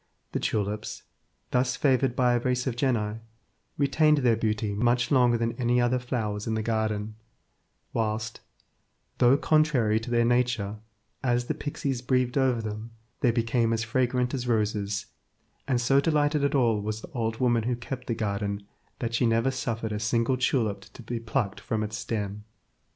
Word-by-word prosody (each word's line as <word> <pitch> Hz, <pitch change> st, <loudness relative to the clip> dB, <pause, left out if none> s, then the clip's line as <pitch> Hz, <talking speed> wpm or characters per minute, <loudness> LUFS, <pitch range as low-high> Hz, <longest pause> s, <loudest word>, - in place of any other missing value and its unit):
The -, -, -1 dB
tulips, 105 Hz, 0 st, -2 dB, 0.5 s
thus 125 Hz, 0 st, +2 dB
favoured 130 Hz, -2 st, +2 dB
by 125 Hz, -1 st, +3 dB
a 120 Hz, -, +2 dB
race 125 Hz, +1 st, 0 dB
of 130 Hz, -4 st, -1 dB
genii, 115 Hz, -4 st, 0 dB, 0.6 s
retained 150 Hz, +2 st, +3 dB
their 125 Hz, -5 st, +3 dB
beauty 110 Hz, -1 st, -1 dB
much 120 Hz, +5 st, +1 dB
longer 125 Hz, -3 st, +4 dB
than 115 Hz, 0 st, 0 dB
any 120 Hz, +1 st, +3 dB
other 120 Hz, +1 st, +2 dB
flowers 110 Hz, -4 st, -3 dB
in 110 Hz, -, 0 dB
the 110 Hz, -, -1 dB
garden, 110 Hz, -1 st, -1 dB, 0.8 s
whilst, 110 Hz, -1 st, -2 dB, 0.8 s
though 125 Hz, +2 st, +6 dB
contrary 145 Hz, -9 st, +3 dB
to 115 Hz, -, -7 dB
their 120 Hz, -1 st, +3 dB
nature, 120 Hz, -4 st, +1 dB, 0.5 s
as 120 Hz, -1 st, +1 dB
the -, -, -1 dB
pixies 140 Hz, -4 st, -3 dB
breathed 125 Hz, -1 st, +1 dB
over 130 Hz, -4 st, +2 dB
them, 110 Hz, +1 st, -5 dB, 0.3 s
they 125 Hz, -, +3 dB
became 115 Hz, 0 st, +1 dB
as 115 Hz, 0 st, 0 dB
fragrant 125 Hz, +1 st, 0 dB
as 125 Hz, -2 st, -3 dB
roses, 105 Hz, -2 st, 0 dB, 0.6 s
and 125 Hz, -3 st, +2 dB
so 135 Hz, +3 st, +4 dB
delighted 150 Hz, -1 st, +2 dB
at 140 Hz, +1 st, +1 dB
all 115 Hz, -6 st, +3 dB
was 110 Hz, +1 st, -3 dB
the 180 Hz, -, -10 dB
old 115 Hz, -5 st, -2 dB
woman 120 Hz, -2 st, +2 dB
who 125 Hz, 0 st, +1 dB
kept 125 Hz, +2 st, -7 dB
the 115 Hz, -, -1 dB
garden 100 Hz, -1 st, -2 dB, 0.3 s
that 115 Hz, -2 st, -3 dB
she 120 Hz, +1 st, +2 dB
never 115 Hz, +3 st, +2 dB
suffered 115 Hz, -4 st, -3 dB
a 105 Hz, -, -2 dB
single 115 Hz, +4 st, +1 dB
tulip 115 Hz, -6 st, 0 dB
to 120 Hz, -, -11 dB
be 120 Hz, +1 st, -3 dB
plucked 110 Hz, -3 st, -2 dB
from 110 Hz, -1 st, -2 dB
its 105 Hz, -1 st, -4 dB
stem. 105 Hz, -2 st, -3 dB
120 Hz, 170 wpm, -27 LUFS, 110-125 Hz, 0.8 s, though